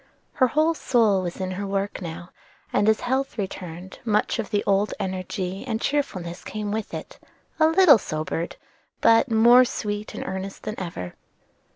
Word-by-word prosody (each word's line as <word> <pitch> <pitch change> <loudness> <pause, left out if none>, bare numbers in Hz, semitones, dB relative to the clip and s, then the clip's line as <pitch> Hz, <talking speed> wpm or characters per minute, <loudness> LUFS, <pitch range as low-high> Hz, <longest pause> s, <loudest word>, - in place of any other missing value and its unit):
Her 255 - +3
whole 310 +5 +2
soul 225 -10 +2
was 175 0 -5
in 185 0 -2
her 200 +2 -4
work 195 +1 -2
now, 170 0 -7 0.4
and 210 - +3
as 220 - +2
health 265 +1 -1
returned, 185 -2 -6
much 215 +1 +1
of 220 - -3
the 205 -2 0
old 200 +1 +1
energy 185 +1 -3
and 220 -2 -1
cheerfulness 190 -13 -2
came 210 -1 -4
with 220 0 -3
it, - - -8 0.4
a 315 - +6
little 325 - +7
sobered, 155 0 -3 0.4
but 230 +4 +5
more 235 +3 +7
sweet 210 -3 -4
and - - -5
earnest 190 +1 -5
than 215 - -3
ever. 95 - -5
205 Hz, 165 wpm, -24 LUFS, 185-235 Hz, 0.4 s, little